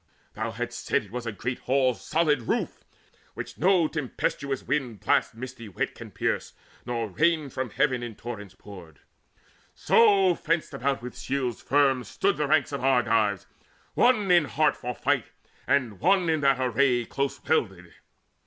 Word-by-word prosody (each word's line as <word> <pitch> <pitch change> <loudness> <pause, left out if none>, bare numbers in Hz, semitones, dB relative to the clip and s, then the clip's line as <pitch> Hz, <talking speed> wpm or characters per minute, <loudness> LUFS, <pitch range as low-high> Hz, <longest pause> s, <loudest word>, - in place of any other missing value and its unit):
Thou - - -3
hadst - - -6
said - - +2
it 100 - -18
was 120 0 -5
a - - -1
great 120 +5 -4
hall's 130 -2 +1
solid 150 -7 +1
roof, - - -2 0.5
Which - - -7
no 180 -3 +4
tempestuous 140 -2 -3
wind 125 -8 -2
blast 105 - +1
misty 125 -2 -8
wet 95 - -3
Can - - -10
pierce, - - -2 0.3
nor 115 -2 -2
rain 155 - +1
from 130 0 -3
heaven 130 +2 +1
in 120 -2 -6
torrents 105 -5 -8
poured. 90 -7 -13 0.7
So 200 -5 +4
fenced 165 0 -2
about 135 -1 -1
with 125 - -7
shields 130 -3 -2
firm 135 -3 +2
stood 110 - 0
the 150 -1 0
ranks 150 -1 +2
Of 140 -2 -4
Argives, 115 -6 +2 0.5
one 220 -6 +3
in 175 -4 +5
heart 150 +2 +1
for 125 0 -5
fight, - - 0 0.4
and 120 -8 +1
one 185 0 +3
In 160 -2 +1
that 135 -2 +3
array 125 -1 +2
close 140 +3 -3
welded. 95 - -1
130 Hz, 160 wpm, -26 LUFS, 115-150 Hz, 0.7 s, in